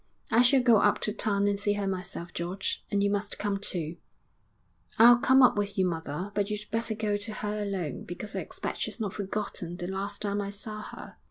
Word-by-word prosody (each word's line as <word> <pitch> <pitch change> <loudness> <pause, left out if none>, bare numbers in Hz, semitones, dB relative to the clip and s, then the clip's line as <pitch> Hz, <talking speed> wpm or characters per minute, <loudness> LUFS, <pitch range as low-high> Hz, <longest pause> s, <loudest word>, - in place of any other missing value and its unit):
'I 230 - +6
shall 250 +1 +5
go 235 -3 +6
up 205 0 +4
to 210 - -1
town 200 -2 +1
and 200 -1 +1
see 205 0 +1
her 205 -1 -2
myself, 185 -2 -4
George; 180 +3 -3
and 200 0 +1
you 200 - +2
must 205 0 -2
come 205 -1 -1
too.' 170 -4 -3 1.0
'I'll 240 +1 +8
come 260 +2 +6
up 250 - +6
with 205 -1 -2
you, 190 - +3
mother, 170 +2 -3
but 205 0 0
you'd 210 0 -2
better 225 0 -1
go 210 -1 0
to 205 +2 -5
her 210 0 -3
alone, 190 -8 -3
because 190 +4 -6
I - - 0
expect - - -5
she's - - -3
not 205 -4 -2
forgotten 195 -4 -4
the 175 - -4
last 195 +3 -3
time 205 0 0
I 200 - -3
saw 215 +1 -5
her.' - - -10
205 Hz, 220 wpm, -29 LUFS, 190-210 Hz, 1.0 s, I'll